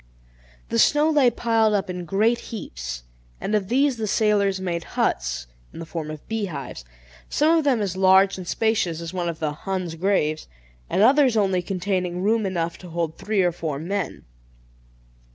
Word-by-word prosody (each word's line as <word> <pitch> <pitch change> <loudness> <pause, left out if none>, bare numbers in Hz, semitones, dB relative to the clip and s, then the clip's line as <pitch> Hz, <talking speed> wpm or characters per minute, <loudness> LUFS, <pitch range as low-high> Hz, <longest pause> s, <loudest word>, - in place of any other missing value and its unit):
The 115 - 0
snow 300 - +4
lay 285 -5 +5
piled 225 -2 +2
up 200 - 0
in 180 -1 -5
great 220 +7 +2
heaps, - - -6 0.4
and 210 - -3
of 205 -3 +1
these 265 +3 +2
the 220 -1 -2
sailors 200 -2 +2
made 175 -3 -3
huts, - - 0 0.3
in - - -12
the 165 - -6
form 160 -2 -5
of 155 -1 -9
bee 225 -2 -1
hives, 140 - -7 0.5
some 315 +3 +3
of 325 - +2
them 255 -6 +2
as 190 -3 -2
large 190 +1 +5
and 185 -2 -8
spacious 220 -7 0
as 170 +1 -6
one 175 -2 -1
of 165 - -5
the 155 -2 -1
"Huns' 185 +2 -4
graves," 165 -3 0 0.4
and 195 - +2
others 265 -1 +5
only 190 -3 +2
containing 180 -1 -2
room 215 0 +2
enough 170 -3 -2
to 180 - -11
hold 165 -1 -2
three 210 -3 +1
or 175 - +2
four 160 -4 -4
men. 185 +5 -4
190 Hz, 180 wpm, -23 LUFS, 170-220 Hz, 0.5 s, lay